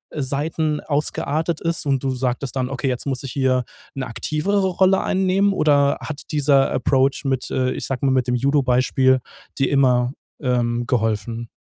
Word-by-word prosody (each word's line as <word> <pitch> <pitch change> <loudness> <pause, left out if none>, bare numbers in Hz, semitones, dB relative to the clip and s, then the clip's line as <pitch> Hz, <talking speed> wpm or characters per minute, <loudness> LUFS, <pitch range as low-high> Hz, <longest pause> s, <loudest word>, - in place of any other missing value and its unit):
Seiten 150 +2 -1
ausgeartet 155 +2 -1
ist? 165 -2 -2
Und 135 -1 0
du 135 - +1
sagtest 130 +1 -2
dann: 130 -1 -1
„Okay, 135 0 -3
jetzt 125 +1 -2
muss 135 -3 -2
ich 135 - -6
hier 130 -2 +1 0.3
'ne 135 -2 -3
aktivere 155 - -1
Rolle 190 +1 +3
einnehmen." 190 +1 +2
Oder 145 -5 +3
hat 155 -2 -6
dieser 140 -2 +3
Approach 135 +2 +1
mit, 130 -2 -1
äh, 130 -1 0
ich - - -4
sag 135 -2 -3
mal, 135 -1 +2
mit 130 -1 +1
dem 125 - +2
Judo 140 +3 +2
Beispiel 130 +1 +3 0.4
dir 135 - +2
immer, 125 -2 +2 0.3
ähm, 120 -2 0
geholfen? 115 -1 -1
135 Hz, 170 wpm, -21 LUFS, 125-150 Hz, 0.4 s, Rolle